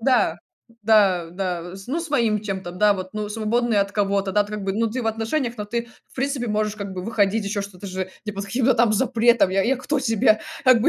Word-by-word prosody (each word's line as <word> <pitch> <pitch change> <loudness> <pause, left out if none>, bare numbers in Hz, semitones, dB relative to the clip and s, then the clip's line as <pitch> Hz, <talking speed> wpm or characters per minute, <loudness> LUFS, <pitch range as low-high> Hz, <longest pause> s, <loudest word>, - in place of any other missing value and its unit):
Да, 255 +2 +2 0.4
да, 200 -6 +4
да. 175 -1 -4
Ну 300 +7 -1
с 335 - -5
своим 230 -8 +1
чем-то, 190 -4 -5
да, 205 +2 +3
вот, 185 -1 -6
ну, 210 -1 -3
свободный 225 +1 0
от 200 0 0
кого-то, 200 -1 0
да, 205 - +4
как 210 0 -6
бы, 195 - 0
ну, 225 +2 +1
ты 250 +1 -3
в - - -3
отношениях, 230 +3 -1
но 210 - -4
ты, 235 +3 -3 0.2
в - - -21
принципе, 270 -2 -1
можешь 210 0 0
как 200 -2 -5
бы 185 - -5
выходить, 210 -1 +1
еще 200 0 -2
что-то 200 0 -9
же, 185 0 -4
не 210 - -4
под 200 0 -5
каким-то 245 +4 +2
там 230 -2 +3
запретом. 235 -2 +3
Я 195 +1 +2
я 265 +4 +2
кто 285 +2 -1
тебе? 220 -3 +3 0.2
Как 255 -3 +6
бы, 295 - +4
215 Hz, 230 wpm, -23 LUFS, 200-235 Hz, 0.4 s, Как